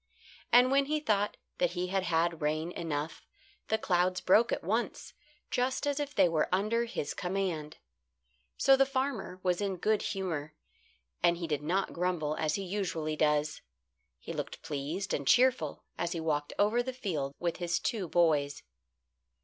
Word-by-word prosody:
And 250 +2 +6
when 275 0 +4
he 305 +2 0
thought 210 -8 0 0.2
that 175 -1 +2
he 180 0 -2
had 195 +1 +1
had 170 -2 0
rain 155 +3 0
enough, 160 -2 -4 0.4
the 220 - +2
clouds 180 -2 +1
broke 220 +5 +4
at - - -1
once, 220 +7 -2 0.4
just 255 +3 0
as 285 0 0
if 290 0 -3
they - - +6
were 160 -2 +1
under 215 +5 +1
his 230 -10 -3
command. 180 -5 -2 0.8
So 270 - +6
the 270 0 +4
farmer 260 -9 -2
was 180 0 +1
in 195 -2 -1
good 215 +3 +1
humour, 160 -6 -3 0.7
and 170 0 +4
he 170 - -3
did 150 -3 -1
not 185 +6 0
grumble 170 -4 -1
as 155 -1 0
he 195 - -3
usually 175 -5 -2
does. 150 0 +1 0.6
He - - -7
looked - - -5
pleased 160 +5 -3
and 140 -2 -2
cheerful 245 - +3 0.2
as 170 0 -1
he 170 - -3
walked 150 -2 -1
over 215 +4 +3
the 260 +1 -4
field 155 - -3
with 170 -1 -2
his 170 -2 0
two 205 -6 -2
boys. 150 -4 +2
180 Hz, 165 wpm, -31 LUFS, 155-215 Hz, 0.8 s, And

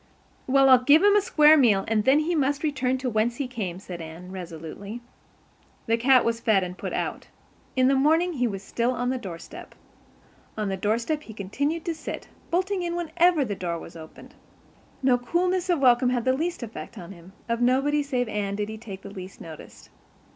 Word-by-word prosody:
"Well, 270 +1 +5
I'll 255 -2 +7
give 295 +7 +6
him 410 0 +6
a 415 - +5
square 305 -5 +6
meal 220 -9 +4
and 215 -1 +1
then 275 +3 +5
he 335 +3 -1
must 285 -1 0
return 260 -4 0
to 260 0 -4
whence 220 +2 +1
he 275 0 -3
came," 205 -8 -5
said 180 -3 -8
Anne 165 +3 -9
resolutely. 180 +4 -8 0.9
The 225 - +2
cat 255 +2 +4
was 230 0 0
fed 215 -5 +2
and 180 0 -5
put - - -6
out. - - -3 0.5
In 255 -1 +4
the 275 - +4
morning 320 +6 +3
he 250 -4 0
was 195 -3 -5
still 235 +4 -1
on 245 0 -1
the 260 - -2
doorstep. 245 - -9 0.8
On 210 -2 -1
the 195 - -1
doorstep 230 +10 -1
he 225 - -11
continued 285 - -2
to 340 - -1
sit, 315 - -7 0.2
bolting 375 +2 0
in 345 -1 -2
whenever 345 -2 +2
the 210 - -3
door 175 -3 -3
was 165 - -11
opened. 160 -1 -12 0.7
No 250 -2 +4
coolness 360 +8 0
of 350 - +3
welcome 250 -2 +4
had 245 -2 -1
the 260 - +3
least 325 +1 -2
effect 230 0 -8
on 175 -1 -9
him; 180 0 -14
of 235 0 -1
nobody 270 +4 +2
save 255 -4 -1
Anne 205 -2 -2
did 210 +1 -3
he 220 0 -7
take 195 -4 -9
the 200 - -9
least 190 -1 -9
notice. 160 -2 -12
245 Hz, 205 wpm, -25 LUFS, 200-295 Hz, 0.9 s, I'll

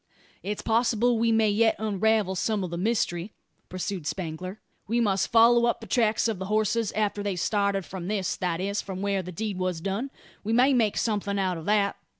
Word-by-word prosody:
"It's 205 +1 -4
possible 235 +1 +2
we 230 0 +2
may 220 -1 +3
yet 225 +2 +3
unravel 215 -1 +1
some 200 +2 -1
o' - - -2
the 170 - -5
mystery," 190 -1 -1 0.4
pursued 185 -3 -4
Spangler. 185 +4 -5 0.3
"We 230 +3 +1
must 200 -4 +1
follow 235 +1 +6
up 235 - 0
the - - -10
tracks 225 -2 +2
of 220 -5 -2
the 190 - -4
horses, 215 +1 0
after 210 -1 -1
they 200 -2 -2
started 200 +1 0
from 180 -2 -7
this 200 -2 -1
that 175 -2 -2
is, 200 +2 -1
from 190 -1 -6
where 200 -1 0
the 180 0 -8
deed 200 +1 -4
was 185 -2 -1
done. 200 +9 -3 0.3
We 220 +2 -1
may 255 +4 +5
make 225 -5 +2
something 205 -2 -1
out 185 -3 0
of 160 - -10
that. 205 -1 +2
205 Hz, 200 wpm, -26 LUFS, 190-225 Hz, 0.4 s, follow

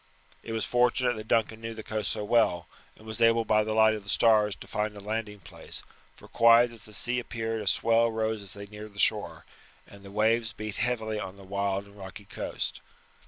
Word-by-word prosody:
It - - -8
was 110 0 -1
fortunate 125 0 +2
that 110 0 -8
Duncan 110 0 +1
knew 115 0 -5
the 110 - -7
coast 110 -2 -2
so - - -3
well, 105 -5 +2 0.3
and 110 - -17
was 110 -1 -6
able 115 0 +4
by 110 0 +3
the 110 0 -2
light 110 0 +5
of 105 - -4
the 100 - -12
stars 105 -3 +4
to - - -12
find 105 0 -3
a - - -7
landing 105 0 -4
place, 90 - -8 0.3
for - - -15
quiet 115 +1 +5
as 115 -3 -11
the 110 - -11
sea 125 +3 +1
appeared 115 -2 -3
a 105 - -6
swell 115 +3 +3
rose 110 -1 -1
as 100 -2 -8
they 100 0 -8
neared 105 0 -11
the - - -9
shore, - - +1 0.4
and 100 - -15
the 100 - -11
waves 110 +3 +1
beat 110 -2 -6
heavily 110 -3 -1
on 95 -1 -6
the 100 - -13
wild 100 0 -2
and 100 +1 -17
rocky 95 +1 -9
coast. - - -5
110 Hz, 220 wpm, -28 LUFS, 105-115 Hz, 0.4 s, light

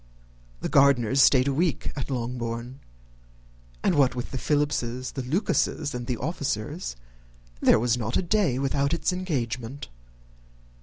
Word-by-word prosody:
The - - -1
Gardiners 135 -3 +4
stayed 130 -1 +5
a 140 - +1
week 165 +3 0
at 140 -1 -4
Longbourn; 120 0 -4 1.0
and - - +3
what 140 -5 +3
with 120 - -5
the 130 - -3
Philipses, 130 -4 -1
the 135 - -4
Lucases, 150 - 0
and 120 -1 -5
the 125 - -1
officers, 145 - -3 0.6
there - - +5
was 120 +1 +1
not 115 0 -1
a - - 0
day 180 - +1
without 140 +3 +1
its 170 - 0
engagement. 130 - -3
135 Hz, 140 wpm, -26 LUFS, 120-145 Hz, 1.0 s, stayed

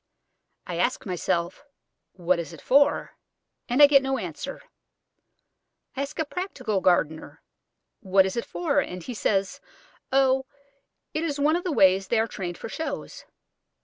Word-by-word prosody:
I - - -5
ask - - 0
myself, 175 - -2 0.5
What 180 -1 0
is 170 0 -6
it 160 - -12
for? 280 +2 +2 0.5
and 255 +5 +5
I - - +13
get 285 -1 +5
no 270 0 -1
answer. 190 - -6 1.3
I 270 - -2
ask 280 - -5
a 315 - 0
practical 255 - -3
gardener 160 -4 0 0.6
what 190 -3 +3
it 190 - -3
is 235 - -1
for, 300 -5 0
and 180 -9 -4
he 250 - -6
says, 195 -2 -1 0.5
"Oh, 265 0 +3 0.7
it 310 - -1
is 295 -3 -2
one 300 +3 +3
of 350 - -2
the 360 - -2
ways 190 -6 +4
they 235 - +1
are 225 - +2
trained 180 -5 -6
for - - -7
shows." 285 +3 -6
235 Hz, 155 wpm, -25 LUFS, 185-280 Hz, 1.3 s, I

